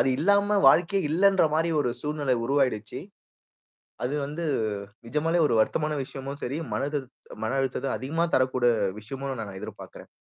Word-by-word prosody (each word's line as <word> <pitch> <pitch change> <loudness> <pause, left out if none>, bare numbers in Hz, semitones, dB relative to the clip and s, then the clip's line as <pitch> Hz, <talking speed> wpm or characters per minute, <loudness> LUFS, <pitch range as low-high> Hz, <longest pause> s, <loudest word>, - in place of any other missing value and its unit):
அது - - +3
இல்லாம 200 +5 +3
வாழ்க்கையே 180 +3 +3
இல்லன்ற 195 +4 +4
மாரி 165 +2 +2
ஒரு 125 -4 +1
சூழ்நிலை 145 -2 0
உருவாயிடுச்சு. 125 -5 0 1.1
அது 125 +3 -1
வந்து 150 +4 -5 0.6
நிஜமாலே 160 +7 0
ஒரு - - 0
வருத்தமான 155 +7 +1
விஷயமும் 135 +2 -7
சரி, 135 +4 -2 0.2
மன 105 - -1
அழுதத் 145 -4 -3 0.3
மன - - -1
அழுத்தத்த 135 0 -1
அதிகமா 150 +8 -1
தரக்கூடிய 130 -1 +1 0.4
விஷயமுமா 135 +4 -5
நான் 100 -2 -8
எதிர்பார்க்குறேன். - - -10
140 Hz, 140 wpm, -26 LUFS, 130-165 Hz, 1.1 s, இல்லன்ற